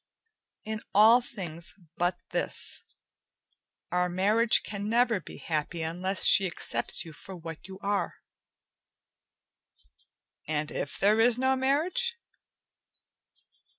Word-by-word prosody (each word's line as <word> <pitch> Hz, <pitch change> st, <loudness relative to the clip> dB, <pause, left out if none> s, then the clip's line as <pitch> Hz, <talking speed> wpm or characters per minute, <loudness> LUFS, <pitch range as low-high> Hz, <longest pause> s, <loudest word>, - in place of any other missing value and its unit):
"In 220 Hz, 0 st, -5 dB
all 225 Hz, +4 st, +7 dB
things 175 Hz, -9 st, -5 dB, 0.2 s
but 175 Hz, +1 st, 0 dB
this. -, -, 0 dB, 1.1 s
Our 180 Hz, 0 st, +1 dB
marriage 210 Hz, +6 st, +3 dB
can 205 Hz, 0 st, -5 dB
never 235 Hz, -2 st, +2 dB
be -, -, -11 dB
happy 160 Hz, +1 st, -3 dB
unless 180 Hz, +3 st, -2 dB
she 195 Hz, -, +7 dB
accepts 170 Hz, -, 0 dB
you 160 Hz, -, -10 dB
for 190 Hz, +5 st, -11 dB
what 165 Hz, +1 st, -9 dB
you 190 Hz, 0 st, -9 dB
are." 200 Hz, 0 st, -1 dB, 2.3 s
"And 150 Hz, 0 st, -2 dB
if -, -, -4 dB
there 210 Hz, +3 st, +3 dB
is 235 Hz, +1 st, +4 dB
no 260 Hz, +1 st, +2 dB
marriage?" 325 Hz, -, 0 dB
195 Hz, 110 wpm, -28 LUFS, 170-230 Hz, 2.3 s, all